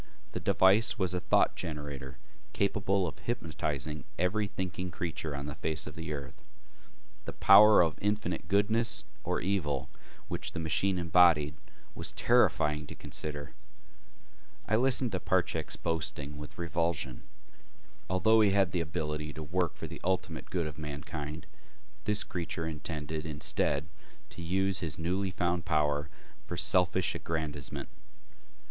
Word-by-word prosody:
The - - -3
device 100 +6 +4
was 95 -4 +1
a 90 - 0
thought 90 - +3
generator 75 -5 -5 0.4
capable 100 -1 +1
of 80 - -6
hypnotizing 75 - -3
every 100 +4 +1
thinking 90 -1 -4
creature 80 -4 -4
on 70 0 -4
the 75 - -4
face 75 +1 -2
of 80 - -7
the 80 -1 -6
earth. 70 -3 -6 0.8
The - - -5
power 105 0 +8
of 80 -3 -1
infinite 105 +1 -1
goodness 110 +3 +2 0.2
or - - -1
evil 80 -9 -1 0.4
which - - -3
the - - -3
machine 90 +4 +1
embodied 85 -4 +5 0.4
was - - -3
terrifying 75 0 +3
to - - -8
consider. 75 -2 -5 1.1
I 110 - +3
listened 125 0 +4
to 95 - -1
Parchak's 85 -3 0
boasting 75 -3 -2
with 75 0 -9
revulsion. 85 -6 -1 0.9
Although 110 +5 +4
he 105 - +5
had 95 -2 +3
the 90 - 0
ability 75 -2 -3
to 80 +2 -6
work 85 +2 -1
for - - -6
the - - -8
ultimate 90 -3 -2
good 90 -3 -1
of 75 0 -6
mankind, 75 +1 -5 0.6
this 105 0 +2
creature 85 -2 -3
intended, 80 0 -4
instead, 75 -1 0 0.5
to 85 - -8
use 95 +2 +1
his 80 -4 -2
newly 95 +4 0
found 90 -1 0
power 75 -4 +1 0.3
for - - -5
selfish - - +2
aggrandizement. 80 -4 -3
85 Hz, 140 wpm, -31 LUFS, 75-95 Hz, 1.1 s, power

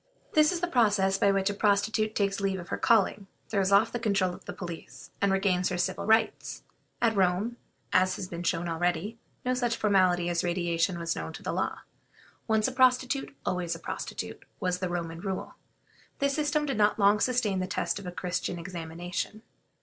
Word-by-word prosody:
This 305 +1 +5
is 350 -2 -2
the 355 - +1
process 205 - +3
by 200 - +4
which 195 +1 +1
a - - -4
prostitute 215 +1 +1
takes 200 -1 +1
leave 195 -1 0
of 175 - -9
her - - -2
calling, 205 -3 +3 0.2
throws 195 -2 +1
off 205 +3 +5
the 240 - -3
control 200 -5 +1
of - - -12
the - - -5
police, 170 -3 -8
and 200 -1 +3
regains 190 -2 +2
her 180 - -2
civil 190 +2 -1
rights. 220 +1 +1 0.4
At 225 -2 +3
Rome, 195 +5 +1 0.4
as 185 0 +4
has 190 - -5
been 170 -1 -6
shown 175 -1 0
already, 175 +6 -1 0.3
no 255 - +2
such 240 -2 0
formality 185 -5 +3
as 175 -1 0
radiation 175 0 0
was 170 0 -2
known - - -5
to - - -10
the - - -2
law; - - -2 0.7
once 220 -1 +3
a - - -2
prostitute, 255 +1 +2
always 180 -2 -1
a - - -9
prostitute, - - -5 0.2
was 180 0 -1
the 185 -1 -2
Roman 165 -2 -3
rule. 190 +1 -4 0.6
This 280 0 +1
system 300 0 +1
did 270 -6 -2
not 210 0 +4
long 205 0 +4
sustain 225 -5 +1
the 185 - -2
test 175 0 -1
of 195 - -8
a - - -4
Christian 180 0 -3
examination. 175 +4 -5
195 Hz, 195 wpm, -28 LUFS, 180-220 Hz, 0.7 s, This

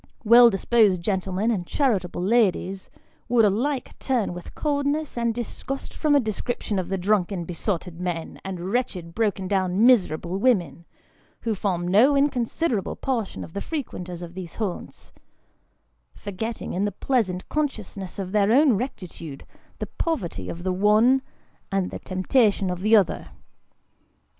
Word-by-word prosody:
Well 235 +2 +8
disposed 200 -3 +3
gentlemen, 190 +3 0
and 180 -6 -2
charitable 195 - 0
ladies, 195 -3 +1 0.4
would 235 -2 +5
alike 250 +7 -1
turn 245 -9 0
with 175 0 -10
coldness 290 +1 -1
and 235 -1 +1
disgust 245 +3 -5
from 300 -2 +2
a - - +6
description 220 -2 -2
of 180 -1 -4
the 195 - -1
drunken 190 -2 0
besotted 175 0 -3
men, 175 -3 -4
and 185 -1 -5
wretched 185 -9 -2
broken 205 -3 0
down 190 +2 +2
miserable 185 -7 +3
women, 180 - +1 0.6
who 230 - -1
form 185 -4 -1
no 230 +10 +5
inconsiderable 260 - 0
portion 235 -7 -3
of 160 - -11
the 200 - -4
fre 325 - -5
quenters 180 -5 -8
of 170 0 -9
these 180 -2 -8
haunts; 205 -6 -5 1.0
forgetting, 220 +3 -5
in 185 - 0
the 205 - 0
pleasant 195 -4 -1
consciousness 215 -10 -3
of 190 -2 -4
their 210 0 +3
own 275 +1 +5
rectitude, 175 - -6 0.3
the - - -3
poverty 185 - -3
of 170 +1 -6
the 185 0 0
one, 215 +7 +4 0.5
and 195 -2 0
the - - -6
temptation 195 0 +1
of 180 0 -4
the 215 +3 +5
other. 195 -5 +2
200 Hz, 145 wpm, -24 LUFS, 180-240 Hz, 1.0 s, Well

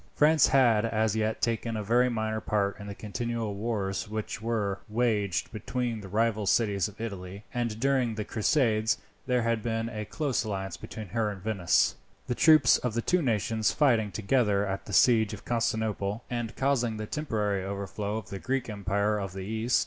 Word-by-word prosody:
France 155 0 +5
had 120 -6 +4
as 110 -1 +1
yet 110 0 -1
taken 115 -1 0
a 105 - -3
very 120 +4 +3
minor 110 -2 -2
part 100 -1 0
in 100 - -8
the 100 - -6
continual 115 +1 -3
wars 100 -1 -2
which 110 -1 -4
were 105 -4 -1
waged 105 -6 0
between 120 +1 -3
the 100 - -9
rival 110 +1 0
cities 100 -2 +2
of 105 0 -13
Italy, 100 -3 -6
and 120 -3 -2
during 130 -3 +1
the 105 -1 -3
Crusades 110 -2 +2 0.3
there 125 -2 +2
had 115 -1 0
been 115 0 -2
a 105 -2 -5
close 140 +1 -1
alliance 95 -4 -4
between 110 +3 -8
her 110 +1 0
and 100 -2 -6
Venice, 100 -6 +2 0.3
the - - -1
troops 150 +1 +6
of 125 -3 -2
the 115 - 0
two 180 0 +2
nations 110 -4 +1
fighting 115 -8 +3
together 105 -2 +1
at 95 0 -4
the - - -6
siege 110 +1 +4
of - - -15
Constantinople, 110 -2 -1
and 120 -1 -3
causing 125 -5 +1
the 110 - -4
temporary 105 -8 -1
overthrow 100 +2 -3
of 110 - -7
the 100 - -5
Greek 130 0 -2
Empire 100 +1 0
of 95 -2 -5
the 95 - -6
East. 110 +4 +1
110 Hz, 185 wpm, -28 LUFS, 100-120 Hz, 0.3 s, troops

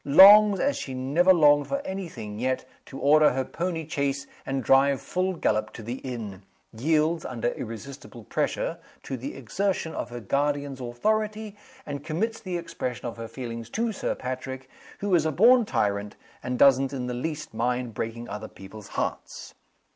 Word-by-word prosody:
Longs, 200 +6 +8
as 285 0 +1
she 130 - -5
never 145 +9 +3
longed 145 -4 +5
for 275 - -1
any 190 -2 -4
thing 105 -6 -7
yet, 130 +1 -1 0.2
to 135 - -9
order 150 +1 +5
her 130 0 -1
pony 165 -1 -3
chaise 140 -2 -1 0.2
and 135 -1 -1
drive 135 +2 +4
full 185 +1 -1
gallop 110 -10 0
to 115 - -9
the 120 +4 -5
inn. 110 -7 -6 0.3
Yields, 155 +6 +1
under 120 -1 -2
irresistible 120 +1 -8
pressure, - - -2 0.2
to 135 - -4
t 130 +3 -5
he - - -10
exertion 165 - -2
of - - -4
her 120 0 -6
guardian's 140 +3 -1
authority, 215 - -1 0.3
and 145 -1 -5
commits 215 +9 -2
the 185 -3 -4
expression 130 -8 -5
of 120 - -5
her 115 0 -6
feelings 115 -2 -7
to 230 - -1
Sir 205 - -2
Patrick, 130 +1 -5 0.3
who 200 -1 0
is 170 -3 +5
a - - 0
born 235 - +6
tyrant, 100 - -1 0.3
and 125 0 -3
doesn't 135 0 +5
in 130 -2 -3
the 125 - -3
least 150 +3 -4
mind 120 +1 -1
breaking 115 +2 -4
other 105 +1 -6
people's 100 +2 -12
hearts. - - -4
135 Hz, 175 wpm, -26 LUFS, 120-170 Hz, 0.3 s, Longs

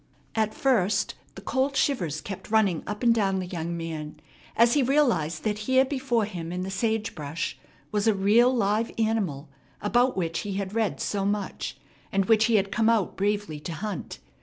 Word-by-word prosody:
At 215 -1 0
first 205 -7 +2 0.2
the 195 - -10
cold 265 +5 0
shivers 175 - 0
kept 195 0 -7
running 205 -6 +3
up 210 +3 -4
and 235 -1 +6
down 195 -4 +1
the 185 - -2
young 170 -1 -4
man 155 -2 -6 0.4
as 235 +1 +5
he 290 - +4
realized 235 - +2
that 210 -1 -1
here 260 0 +5
before 260 -5 0
him 170 -5 -6
in 180 +1 -3
the 190 - -4
sage 220 +2 -1
brush 155 0 -4 0.3
was 210 0 0
a 220 - +4
real 215 +6 +4
live 225 -1 +1
animal 205 -11 0 0.3
about 240 +3 +2
which 165 -3 -1
he 205 - -4
had 195 0 -3
read 225 -2 0
so 200 -1 -1
much, 205 0 -2 0.3
and 195 0 +2
which 220 +1 +4
he 230 -1 +3
had 195 -1 +2
come 225 +2 +2
out 220 -5 +1
bravely 205 -6 -1
to 165 +3 -6
hunt. 200 +1 -5
205 Hz, 185 wpm, -26 LUFS, 180-230 Hz, 0.4 s, and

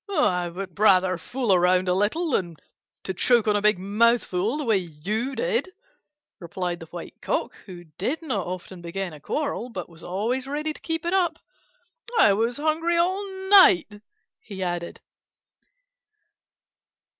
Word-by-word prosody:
"I 185 - +1
would 185 +1 -8
rather 185 -3 +4
fool 245 +1 0
around 180 +1 +3
a 180 - +3
little 215 - 0
than 175 -8 -1 0.5
to 190 - -3
choke 235 +4 +2
on 210 - +3
a 205 - +1
big 210 -1 +3
mouthful, 210 +2 +1
the 305 - -3
way 225 -6 +3
you 195 - -4
did," 480 -6 -1 0.7
replied 175 0 -4
the 165 - -10
White 175 +1 -10
Cock, - - -1
who 175 -2 -9
did 195 - -4
not 215 - -2
often 180 0 -7
begin 175 +1 -4
a 150 - -11
quarrel, 280 - -3
but 185 -7 -6
was 165 -1 -15
always 230 +8 -2
ready 300 +2 -2
to - - -15
keep 325 0 -3
it 345 - 0
up. 365 -3 +1 0.8
"I 205 - +6
was 230 +4 0
hungry 320 +3 +1
all 370 +4 +1 0.3
night," 210 - +6 0.4
he 190 -3 -7
added. 175 -1 -4
205 Hz, 155 wpm, -25 LUFS, 180-280 Hz, 0.8 s, I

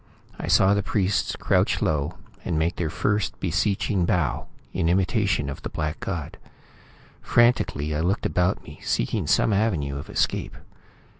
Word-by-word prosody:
I - - -4
saw 95 +1 +5
the 100 - +2
priests 100 0 0
crouch - - +1
low, 75 -2 -1 0.3
and 85 -3 -1
make 85 +3 0
their 80 -3 -1
first 100 +4 -1
beseeching 95 +2 0
bow, 75 -8 0 0.3
in 85 - +1
imitation 95 - +1
of 70 - -6
the - - -5
black 75 0 -3
god. 85 -7 -5 0.8
Frantically, 120 - +2
I 75 - -1
looked 90 +6 0
about 90 +2 +1
me, - - -12
seeking - - -1
some 110 - +3
avenue 80 -10 0
of - - -9
escape. - - -1
90 Hz, 150 wpm, -25 LUFS, 75-100 Hz, 0.8 s, saw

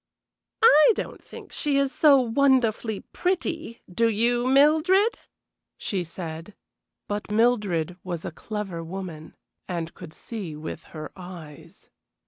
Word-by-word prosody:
"I 310 -1 +8
don't - - -6
think - - -12
she 290 -2 0
is 275 -1 +1
so 285 -3 +6
wonderfully 240 -4 +2
pretty, 335 -8 -3
do 230 +6 +1
you, 240 +3 +1
Mildred?" 315 - +4 0.6
she 190 -3 -2
said. 165 +2 -8 0.5
But 205 0 -4
Mildred 210 -7 +1
was 175 -3 -5
a - - -4
clever 195 -2 -5
woman, 170 -3 -7 0.3
and 170 -2 -4
could 155 - -11
see 200 -9 -6
with 155 +1 -7
her 155 -1 -8
eyes. 175 -5 -12
210 Hz, 120 wpm, -25 LUFS, 170-270 Hz, 0.6 s, I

